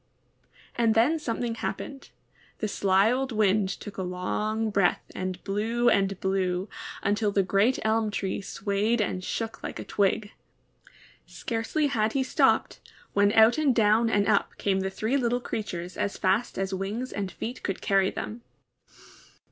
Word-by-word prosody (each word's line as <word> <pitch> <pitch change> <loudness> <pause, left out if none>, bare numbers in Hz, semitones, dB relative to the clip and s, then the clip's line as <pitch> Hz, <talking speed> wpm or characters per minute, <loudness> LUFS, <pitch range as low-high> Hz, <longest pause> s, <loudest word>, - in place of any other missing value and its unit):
And 230 -1 +2
then 275 +9 +3
something 235 -3 -2
happened. 270 +4 -5 0.5
The 215 - -2
sly 195 +1 +3
old 260 +1 -1
Wind 210 -2 +2
took 195 +2 -7
a - - -2
long 210 +5 -2
breath 195 -3 +2
and 185 -1 -4
blew 230 +4 +1
and 195 -1 +1
blew, 190 -1 0 0.4
until 205 +1 +1
the 200 -1 +2
great 200 +7 +2
elm 220 0 +1
tree 200 -1 -2
swayed 200 +4 -1
and 185 -3 -1
shook 225 +4 -4
like - - -6
a - - -5
twig. 205 +1 0 1.0
Scarcely 230 +6 -2
had 225 -6 +1
he 270 - +1
stopped, - - +2 0.3
when 200 0 +4
out 225 +6 +6
and 280 -5 +3
down 225 +1 +4
and 205 -2 +2
up 215 -2 +1
came 195 -1 +1
the 190 0 -1
three 220 +7 -1
little 245 -2 +1
creatures 180 -7 -5
as 200 - -2
fast 200 +6 0
as 195 0 -2
wings 205 +7 -3
and 195 -1 -3
feet 240 +8 -6
could 195 - -3
carry 195 -1 +2
them. 230 +3 -6
210 Hz, 155 wpm, -27 LUFS, 195-230 Hz, 1.0 s, out